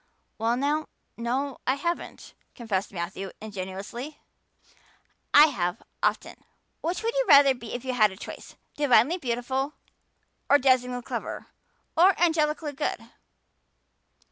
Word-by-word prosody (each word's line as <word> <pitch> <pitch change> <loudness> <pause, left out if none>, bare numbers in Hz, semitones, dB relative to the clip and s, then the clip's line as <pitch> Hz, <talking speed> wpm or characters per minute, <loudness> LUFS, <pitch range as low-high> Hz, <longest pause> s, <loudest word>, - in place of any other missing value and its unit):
"Well 230 +2 +1
now, 295 +3 0 0.3
no, 255 +4 -2
I 260 - +3
haven't," 340 +5 -4 0.2
confessed 210 -6 -2
Matthew 190 +1 -5
ingenuously. 205 +7 -7 1.1
"I 295 - +9
have, 180 - -2 0.2
often. - - -1 0.4
Which 350 +6 -2
would 460 +1 0
you - - +1
rather 280 -2 +8
be 245 -2 -8
if 245 +1 -6
you 260 - -1
had 215 -4 +5
the 190 - -11
choice - - -9 0.2
divinely 290 +4 +3
beautiful 260 +2 -2 0.7
or 285 - +7
dazzlingly 250 -2 +2
clever - - -5 0.5
or 365 +3 +5
angelically 310 -3 +1
good?" 290 +2 -4
260 Hz, 120 wpm, -26 LUFS, 230-300 Hz, 1.1 s, I